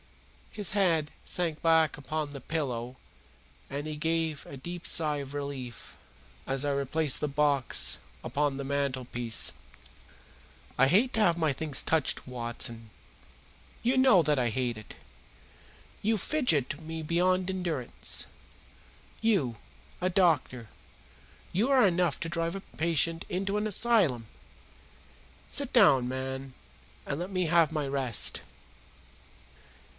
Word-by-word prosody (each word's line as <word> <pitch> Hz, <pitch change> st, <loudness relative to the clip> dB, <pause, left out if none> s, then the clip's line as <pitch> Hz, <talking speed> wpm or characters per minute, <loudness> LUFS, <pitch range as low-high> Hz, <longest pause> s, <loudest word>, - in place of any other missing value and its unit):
His 205 Hz, -5 st, +4 dB
head 170 Hz, -7 st, +2 dB
sank 165 Hz, -4 st, +1 dB
back 160 Hz, -2 st, +3 dB
upon 150 Hz, +1 st, -4 dB
the 140 Hz, -1 st, -8 dB
pillow 125 Hz, -5 st, -3 dB, 0.7 s
and 140 Hz, +2 st, -4 dB
he 155 Hz, -, -4 dB
gave 160 Hz, -1 st, -1 dB
a 140 Hz, -, -9 dB
deep 175 Hz, +6 st, -7 dB
sigh 150 Hz, -3 st, +2 dB
of 140 Hz, -1 st, -7 dB
relief 140 Hz, -4 st, -6 dB, 0.5 s
as 135 Hz, +1 st, -1 dB
I 145 Hz, -, +1 dB
replaced 140 Hz, +1 st, +1 dB
the 150 Hz, -, 0 dB
box 140 Hz, -2 st, 0 dB, 0.2 s
upon 145 Hz, -1 st, -1 dB
the 140 Hz, -, -4 dB
mantelpiece. 130 Hz, -4 st, -1 dB, 1.2 s
"I 135 Hz, -, +5 dB
hate 215 Hz, -, +3 dB
to -, -, 0 dB
have 170 Hz, -5 st, +3 dB
my 160 Hz, -4 st, +1 dB
things 150 Hz, 0 st, +1 dB
touched, 160 Hz, -4 st, 0 dB
Watson. 120 Hz, -2 st, -3 dB, 0.9 s
You 245 Hz, +3 st, +2 dB
know 260 Hz, -9 st, +5 dB
that 150 Hz, -2 st, +1 dB
I 120 Hz, -2 st, +1 dB
hate 125 Hz, 0 st, -1 dB
it. 110 Hz, -1 st, -11 dB, 1.1 s
You 220 Hz, +2 st, +1 dB
fidget 170 Hz, -, +1 dB
me 160 Hz, 0 st, -6 dB
beyond 180 Hz, +3 st, +1 dB
endurance. 170 Hz, -9 st, -1 dB, 1.0 s
You, 195 Hz, -, +1 dB, 0.5 s
a 185 Hz, -, +1 dB
doctor 155 Hz, -, +1 dB, 0.9 s
you 210 Hz, +9 st, +1 dB
are 260 Hz, -6 st, +5 dB
enough 175 Hz, -4 st, +1 dB
to -, -, -2 dB
drive 170 Hz, +1 st, -2 dB
a 195 Hz, -, -5 dB
patient 165 Hz, -1 st, -1 dB
into 195 Hz, +2 st, -2 dB
an 210 Hz, +1 st, 0 dB
asylum. 200 Hz, -, +2 dB, 1.2 s
Sit 280 Hz, -2 st, -1 dB
down, 140 Hz, -, +5 dB
man, 130 Hz, 0 st, -4 dB, 0.5 s
and 140 Hz, -, -3 dB
let 180 Hz, +2 st, -4 dB
me 185 Hz, -2 st, -1 dB
have 165 Hz, -1 st, +3 dB
my 150 Hz, -3 st, -2 dB
rest!" 135 Hz, -5 st, +2 dB
155 Hz, 130 wpm, -29 LUFS, 135-180 Hz, 1.2 s, I